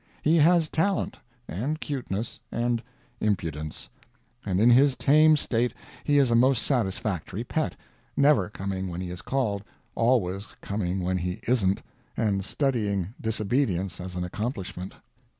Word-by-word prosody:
He 160 +2 +4
has 165 +1 +5
talent, 190 +6 0 0.3
and 140 - -2
cuteness, 120 -8 -4
and 120 0 0 0.4
impudence; 80 -7 -2 0.6
and 95 -2 0
in 115 +3 +6
his 135 +2 +6
tame 155 +3 +5
state 120 -3 0 0.3
he 145 -1 +3
is 135 -4 +4
a - - +4
most 125 +1 +4
satisfactory 105 - -1
pet 155 +4 -1 0.4
never 145 -2 +4
coming 95 -2 -4
when 85 -1 -5
he 90 -1 -4
is 90 - -7
called, 110 -7 -1 0.3
always 105 -5 +1
coming 95 -2 -2
when 90 +1 0
he 90 +1 -3
isn't, 100 -6 +2 0.3
and 100 -3 +1
studying 105 - -1
disobedience 105 -4 0
as 90 0 -7
an 90 - -2
accomplishment. 100 -1 -4
110 Hz, 135 wpm, -27 LUFS, 95-135 Hz, 0.6 s, in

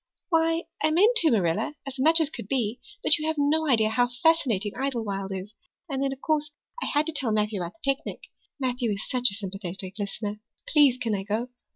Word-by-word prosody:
"Why, 330 -1 +2 0.2
I 310 - +4
meant 405 +10 +4
to, 335 -7 +4
Marilla, 190 - +1
as 275 -1 -7
much 320 +5 +5
as 315 -2 +1
could 200 - -7
be. 235 -1 -1 0.2
But 310 - +6
you 305 - -2
have 315 - +1
no 305 +2 +2
idea 220 -4 +4
how 245 +1 +2
fascinating 240 - +2
Idlewild 220 -8 -3
is. 190 +2 -6 0.3
And 270 -4 -3
then, 275 0 +1
of 270 0 -7
course, 305 -1 0 0.3
I - - -1
had 295 +1 +1
to 325 - -1
tell 265 -6 -1
Matthew 210 -2 0
about 175 +1 -5
the 275 +5 0
picnic. 270 - -9 0.4
Matthew 250 -4 0
is 200 - -5
such 250 -1 +3
a 195 - -1
sympathetic 195 -2 -6
listener. 205 +1 -3 0.3
Please 285 -5 +5
can 230 -3 -2
I 195 - -1
go?" 215 +5 -2
250 Hz, 210 wpm, -26 LUFS, 205-300 Hz, 0.4 s, But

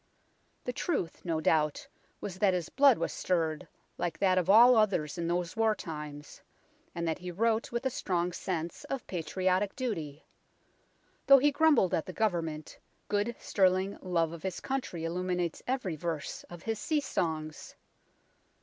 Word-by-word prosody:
The 250 - -3
truth 240 - -2
no 165 -3 -1
doubt 155 -1 +1 0.3
was 185 -2 -6
that 195 -3 +3
his 175 -3 -3
blood 275 -3 +5
was - - -2
stirred, 165 -2 -1 0.3
like 175 -1 -2
that 185 -2 +3
of 180 0 -2
all 240 +5 +8
others 190 -9 +2
in 170 - -1
those 175 0 -1
war 220 -1 +2
times, 150 -4 -8 0.5
and 170 -1 -2
that 160 - -1
he 180 0 -6
wrote 220 +5 0
with 240 +2 -3
a 265 - +1
strong 180 -9 -1
sense 170 -2 -4
of 270 -2 -4
patriotic 185 +3 -1
duty. 165 - -4 1.0
Though 275 - +10
he 290 +2 +4
grumbled 290 - +4
at 160 - 0
the 185 - -6
Government, 165 -8 -2 0.3
good 210 +3 0
sterling 190 0 +2
love 170 -3 0
of 170 - -8
his 190 -2 -4
country 260 -11 -3
illuminates 180 0 -2
every 245 -10 -1
verse 165 -2 -4
of 175 -2 -11
his 225 -1 -2
sea 310 -2 +1
songs. 155 - -3
180 Hz, 160 wpm, -30 LUFS, 165-220 Hz, 1.0 s, Though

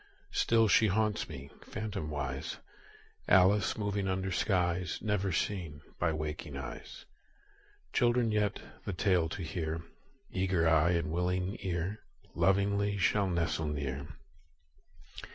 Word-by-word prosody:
Still 115 -1 +3
she 110 +3 +5
haunts 105 +1 +1
me, 70 -2 -8
phantomwise, 75 -10 -4 0.7
Alice 95 +2 +5
moving 100 -2 -1
under 95 0 -1
skies 90 -2 +1
Never 105 -3 0
seen 85 -5 -2 0.2
by 85 -2 +2
waking 75 -1 -4
eyes. - - -8 0.9
Children 120 -2 +3
yet, 105 -1 +1 0.2
the 100 - -3
tale 90 -2 +2
to 90 - -5
hear, 80 -1 -3 0.5
Eager 95 -3 +1
eye 80 +2 +4
and 85 -2 0
willing 90 +3 0
ear, 95 +2 -2 0.3
Lovingly 100 +1 +2
shall 100 0 +2
nestle 85 -2 0
near. 70 -1 -3
90 Hz, 115 wpm, -32 LUFS, 80-100 Hz, 0.9 s, she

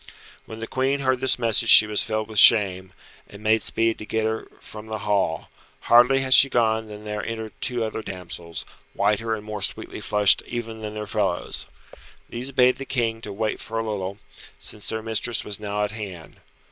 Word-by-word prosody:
When 110 - -9
the 115 - -4
Queen 135 +3 -1
heard 130 -1 +1
this 130 0 +1
message 115 -1 +1
she 110 - +11
was 105 -1 0
filled 110 -1 -2
with 110 -2 -1
shame, 95 -4 +5 0.4
and 105 +1 -13
made 110 +1 +3
speed 115 0 -1
to 105 - -7
get 110 -1 -1
her 110 0 -3
from 110 0 -11
the 110 0 -4
hall 100 -6 -1 0.3
Hardly 125 +3 +5
had 130 -1 +2
she 135 - +7
gone 110 -2 +1
than 105 0 -10
there 105 0 -4
entered 110 -1 -6
two 125 -2 -1
other 110 0 -4
damsels, 85 -4 -7 0.3
whiter 105 +2 0
and 105 -1 -10
more 105 -1 -6
sweetly - - -1
flushed 105 -3 +3
even 115 -2 -6
than 105 0 -6
their 105 0 -5
fellows. 100 -4 -2 0.6
These 125 +3 -5
bade 125 -1 +3
the 135 - -7
King 115 -4 -2
to 105 - -7
wait 110 +2 -3
for 115 - -6
a 115 0 -2
little, 100 -2 -4 0.4
since 105 - -4
their 110 0 -3
mistress 115 +1 0
was 105 -1 -4
now 105 0 -3
at 105 - -2
hand. 95 -7 -8
110 Hz, 195 wpm, -23 LUFS, 105-115 Hz, 0.6 s, she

